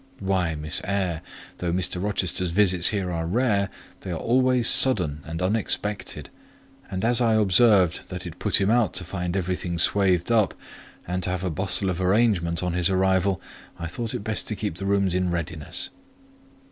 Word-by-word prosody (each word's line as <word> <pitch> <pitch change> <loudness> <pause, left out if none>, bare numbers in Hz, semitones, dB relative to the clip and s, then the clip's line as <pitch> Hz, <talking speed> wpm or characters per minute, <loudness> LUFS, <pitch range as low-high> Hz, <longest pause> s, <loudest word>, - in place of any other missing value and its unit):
"Why, 95 -4 0
Miss 75 +1 -1
Eyre, 95 -5 -2 0.4
though 90 -1 -2
Mr. 90 +1 -1
Rochester's 95 -3 0
visits 90 -1 +3
here 95 -4 -1
are 80 -1 -3
rare, 100 -1 +1 0.3
they 95 - -9
are 85 - -3
always 125 +3 +2
sudden 90 - +4
and 80 +3 -5
unexpected; 105 +1 -2 0.6
and 95 +2 -3
as 120 +1 +3
I 115 -2 +3
observed 100 -3 +3
that 90 -1 -7
it 85 -1 -9
put 105 - +3
him 100 +1 +2
out 120 -3 +2
to - - 0
find 90 0 -3
everything 90 -1 -3
swathed 95 +2 +2
up, 110 -5 +2 0.5
and 90 +1 -2
to 90 - 0
have 90 0 -3
a 90 - -1
bustle 95 +2 0
of 90 +1 -4
arrangement 95 -4 +1
on 90 -1 -1
his 90 0 +1
arrival, 95 0 +1 0.4
I 85 - -6
thought 110 +7 -4
it - - -5
best 110 0 -2
to 110 - -2
keep 105 -5 -4
the 95 - -4
rooms 100 -2 +1
in 90 0 0
readiness." 85 -3 -3
95 Hz, 180 wpm, -24 LUFS, 90-105 Hz, 0.6 s, sudden